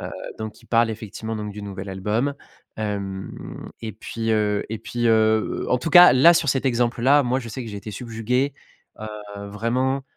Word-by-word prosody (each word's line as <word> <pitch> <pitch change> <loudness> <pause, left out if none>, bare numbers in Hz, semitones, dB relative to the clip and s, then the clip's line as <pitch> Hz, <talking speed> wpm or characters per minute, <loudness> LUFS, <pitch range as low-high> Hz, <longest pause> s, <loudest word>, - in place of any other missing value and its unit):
heu, - - -8 0.2
donc 110 0 -6
ils - - -20
parlent, 115 -1 +3
effectivement, 110 0 -5
donc 105 -1 -4
du 105 +1 -8
nouvel 100 -1 -6
album, 105 +9 -1 0.4
hem 100 -3 -5
et 110 -1 -4
puis, 115 +2 -4
heu 105 -1 +1
et 110 - -3
puis, 120 +1 -2
heu - - +5 0.5
heu - - -6
en 125 - +3
tout 125 - -3
cas, 175 -2 +9
là, 140 +7 +7
sur 165 -3 +1
cet 135 0 +1
exemple-là, 120 +3 +3
moi, 125 +1 0
je 120 -3 -8
sais 130 - -5
que - - -6
j'ai 105 - -7
été 100 +1 -7
subjugué, 125 +5 -1 0.5
heu, 110 - -5 0.4
vraiment, 125 +6 -1
115 Hz, 195 wpm, -23 LUFS, 105-125 Hz, 0.5 s, cas